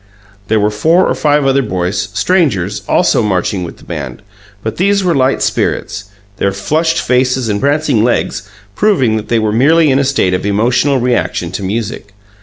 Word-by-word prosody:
There 110 Hz, 0 st, +2 dB
were 105 Hz, +1 st, +1 dB
four 160 Hz, -, +2 dB
or -, -, +1 dB
five 150 Hz, -1 st, +1 dB
other 135 Hz, 0 st, +2 dB
boys, 90 Hz, -4 st, -2 dB
strangers, 135 Hz, -, 0 dB
also -, -, +2 dB
marching 95 Hz, -2 st, -1 dB
with 85 Hz, -, -8 dB
the -, -, -18 dB
band, 70 Hz, -3 st, -7 dB, 0.4 s
but 110 Hz, -, -4 dB
these 200 Hz, +2 st, +2 dB
were 180 Hz, -2 st, +1 dB
light 135 Hz, -2 st, +1 dB
spirits, 100 Hz, -, -2 dB, 0.3 s
their 100 Hz, -, 0 dB
flushed 160 Hz, -, 0 dB
faces 125 Hz, -1 st, 0 dB
and 100 Hz, -1 st, -1 dB
prancing 140 Hz, -5 st, +1 dB
legs 120 Hz, -, 0 dB, 0.3 s
proving 135 Hz, -, +2 dB
that 110 Hz, 0 st, -6 dB
they 115 Hz, -, +1 dB
were 110 Hz, -1 st, 0 dB
merely 150 Hz, +6 st, +4 dB
in 135 Hz, -, +2 dB
a -, -, +2 dB
state 130 Hz, -9 st, +1 dB
of 90 Hz, -, -1 dB
emotional 120 Hz, +7 st, +1 dB
reaction 100 Hz, -8 st, -1 dB
to 95 Hz, -, -5 dB
music. 100 Hz, +1 st, -4 dB
120 Hz, 180 wpm, -13 LUFS, 100-145 Hz, 0.4 s, merely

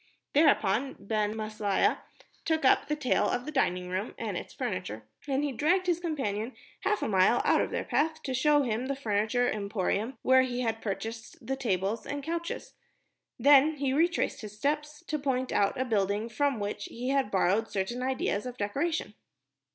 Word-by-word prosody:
Thereupon 275 Hz, -4 st, +3 dB
Ben 215 Hz, 0 st, -1 dB
Maslia 215 Hz, -2 st, 0 dB, 0.4 s
took 320 Hz, -3 st, 0 dB
up -, -, +4 dB
the 300 Hz, -, 0 dB
tale 290 Hz, -4 st, +1 dB
of 245 Hz, -, -1 dB
the 305 Hz, -, -5 dB
dining 180 Hz, -, 0 dB
room 185 Hz, +4 st, -3 dB
and 215 Hz, -4 st, -3 dB
its -, -, -5 dB
furniture, 185 Hz, -, -4 dB, 0.2 s
and 275 Hz, 0 st, 0 dB
he 290 Hz, -, 0 dB
dragged 340 Hz, +9 st, +2 dB
his 350 Hz, -2 st, +1 dB
companion 260 Hz, -, -2 dB, 0.2 s
half 420 Hz, -, 0 dB
a -, -, 0 dB
mile 195 Hz, +4 st, +4 dB
out -, -, +4 dB
of -, -, -1 dB
their -, -, -2 dB
path 315 Hz, +1 st, 0 dB
to 265 Hz, -, -3 dB
show 290 Hz, +3 st, +4 dB
him 240 Hz, +1 st, -1 dB
the 275 Hz, -, -1 dB
furniture 220 Hz, 0 st, +1 dB
emporium 210 Hz, +3 st, -1 dB
where 260 Hz, 0 st, +6 dB
he 250 Hz, -1 st, -1 dB
had 225 Hz, -2 st, -1 dB
purchased 225 Hz, +2 st, -5 dB
the 270 Hz, -, -1 dB
tables 215 Hz, -4 st, -1 dB
and 285 Hz, 0 st, -4 dB
the -, -, -9 dB
couches. 335 Hz, +1 st, -4 dB, 0.6 s
Then 290 Hz, +2 st, +6 dB
he 275 Hz, -2 st, -1 dB
retraced 335 Hz, +4 st, +1 dB
his 210 Hz, -1 st, -9 dB
steps 300 Hz, +5 st, -2 dB
to 305 Hz, -2 st, -2 dB
point 260 Hz, -2 st, -1 dB
out 200 Hz, +4 st, +1 dB
a 260 Hz, -, +1 dB
building 210 Hz, -1 st, 0 dB
from 270 Hz, +2 st, 0 dB
which 205 Hz, 0 st, -3 dB
he 245 Hz, +2 st, -5 dB
had 275 Hz, -4 st, +1 dB
borrowed 200 Hz, +3 st, +2 dB
certain 200 Hz, +6 st, -2 dB
ideas 255 Hz, -4 st, -1 dB
of 250 Hz, 0 st, -7 dB
decoration. 275 Hz, +6 st, -1 dB
250 Hz, 180 wpm, -29 LUFS, 210-285 Hz, 0.6 s, where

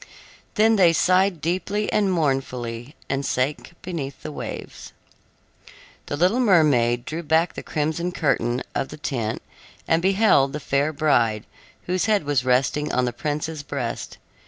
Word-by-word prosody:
Then 220 Hz, +1 st, +4 dB
they 175 Hz, -4 st, +5 dB
sighed 185 Hz, 0 st, +2 dB
deeply 190 Hz, +6 st, -1 dB
and 200 Hz, -2 st, +2 dB
mournfully, 135 Hz, -5 st, -2 dB
and 135 Hz, +1 st, -1 dB
sank 140 Hz, +5 st, -2 dB
beneath 150 Hz, -7 st, -5 dB
the -, -, -5 dB
waves. -, -, -8 dB, 1.1 s
The 145 Hz, -, -3 dB
little 185 Hz, -, +2 dB
mermaid 140 Hz, -, +3 dB
drew 160 Hz, +2 st, -4 dB
back 160 Hz, +2 st, +1 dB
the -, -, -6 dB
crimson 160 Hz, +3 st, -2 dB
curtain 125 Hz, -7 st, 0 dB
of 135 Hz, -, -2 dB
the 150 Hz, -, -9 dB
tent 120 Hz, -7 st, -3 dB, 0.4 s
and 165 Hz, +1 st, +2 dB
beheld 190 Hz, -8 st, +3 dB
the 150 Hz, -, -3 dB
fair 140 Hz, +1 st, 0 dB
bride, 120 Hz, -8 st, +1 dB, 0.4 s
whose 180 Hz, 0 st, -1 dB
head 215 Hz, -5 st, +2 dB
was 145 Hz, -4 st, 0 dB
resting 130 Hz, +4 st, +1 dB
on 125 Hz, -, +1 dB
the 120 Hz, -, -2 dB
prince's 150 Hz, +3 st, -3 dB
breast. 135 Hz, -5 st, -5 dB
150 Hz, 145 wpm, -23 LUFS, 130-175 Hz, 1.1 s, they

